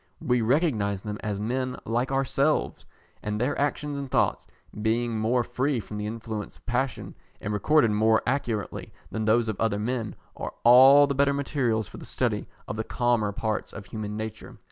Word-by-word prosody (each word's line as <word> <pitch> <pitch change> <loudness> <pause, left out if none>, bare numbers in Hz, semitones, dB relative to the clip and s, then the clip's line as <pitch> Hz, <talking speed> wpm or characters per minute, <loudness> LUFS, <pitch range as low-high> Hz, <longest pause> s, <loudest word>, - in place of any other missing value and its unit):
We 125 -1 +1
recognise 110 - +1
them 105 0 -5
as 105 -2 -3
men 125 +4 -2
like 120 +4 -1
ourselves, 135 +2 0 0.3
and 105 0 -3
their 125 +5 0
actions 145 0 -1
and 140 -1 -5
thoughts, - - +1 0.3
being 115 +1 0
more 120 +3 +2
free 125 +2 -1
from 105 0 -7
the 105 - -3
influence 110 -1 -5
of - - -26
passion, 125 +1 -2 0.3
and 105 - -3
recorded 115 +3 +3
more 110 +1 +3
accurately 120 -6 -2 0.2
than 110 -1 -2
those 115 +1 +3
of 110 - -3
other 110 -2 +1
men, 115 0 -2 0.2
are - - -6
all 130 +4 +8
the 140 - -1
better 140 +1 +3
materials 125 -7 0
for - - -11
the - - -10
study - - -1 0.2
of 105 - -4
the 110 - -1
calmer 120 -3 +1
parts 110 +1 -3
of 100 - -8
human 105 +1 -5
nature. 110 0 -7
115 Hz, 180 wpm, -26 LUFS, 110-130 Hz, 0.3 s, all